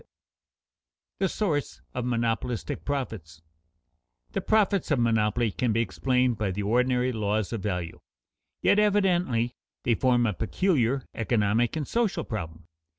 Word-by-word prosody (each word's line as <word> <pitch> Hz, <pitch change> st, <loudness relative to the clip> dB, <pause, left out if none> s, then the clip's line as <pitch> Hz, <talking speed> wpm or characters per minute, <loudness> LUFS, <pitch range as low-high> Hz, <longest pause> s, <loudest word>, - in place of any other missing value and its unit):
[Sidenote: -, -, -28 dB, 1.1 s
The 190 Hz, -1 st, +2 dB
source 160 Hz, -10 st, -2 dB
of 125 Hz, -1 st, -3 dB
monopolistic 120 Hz, -1 st, -1 dB
profits] 105 Hz, -, -4 dB, 0.9 s
The -, -, -2 dB
profits 205 Hz, -3 st, +2 dB
of 145 Hz, -, +3 dB
monopoly 115 Hz, -1 st, +2 dB
can 120 Hz, +2 st, 0 dB
be 115 Hz, -, +2 dB
explained 115 Hz, +5 st, +1 dB
by 105 Hz, -2 st, 0 dB
the 100 Hz, +2 st, -3 dB
ordinary 125 Hz, +3 st, +2 dB
laws 105 Hz, -1 st, -1 dB
of 115 Hz, -, -3 dB
value, 90 Hz, -5 st, -3 dB, 0.6 s
yet 205 Hz, -, +5 dB
evidently 180 Hz, -, +2 dB, 0.3 s
they 120 Hz, -, +2 dB
form 120 Hz, +1 st, +3 dB
a 105 Hz, -, +1 dB
peculiar 135 Hz, -, +1 dB
economic 115 Hz, +1 st, +1 dB
and 155 Hz, -3 st, -3 dB
social 230 Hz, -4 st, 0 dB
problem. 80 Hz, -6 st, -6 dB
120 Hz, 135 wpm, -27 LUFS, 105-135 Hz, 1.1 s, yet